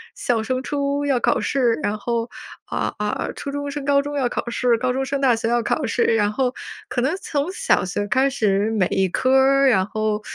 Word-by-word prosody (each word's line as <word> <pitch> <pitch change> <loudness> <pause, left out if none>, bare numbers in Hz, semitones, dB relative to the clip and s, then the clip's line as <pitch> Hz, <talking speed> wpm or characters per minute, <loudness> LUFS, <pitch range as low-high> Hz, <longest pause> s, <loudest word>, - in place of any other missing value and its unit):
小 230 -3 0
升 255 +2 -2
初 285 0 -1
要 270 -3 +2
考 - - +2
试， 250 -2 +1
然 210 +1 -1
后， 235 +1 -2 0.4
啊 - - -2
啊， 210 0 -2
初 280 - -5
中 285 0 -4
升 290 -1 -5
高 280 0 +3
中 290 +1 -5
要 250 -3 +1
考 - - -4
试、 240 -1 +1
高 250 +2 0
中 265 +1 -1
升 275 +1 -2
大 250 -4 +4
学 225 0 -2
要 240 -1 +1
考 300 - -1
试。 235 +1 0
然 210 -2 +2
后 255 +2 0 0.4
可 245 - -1
能 285 +8 0
从 300 0 -2
小 - - +1
学 205 +2 -3
开 265 +5 +2
始， 210 -5 +1
每 200 -5 +1
一 190 -1 0
科 255 +8 0
儿， 275 +1 +4
然 190 -7 +3
后， 215 0 -1
250 Hz, 240 characters per minute, -22 LUFS, 220-275 Hz, 0.4 s, 大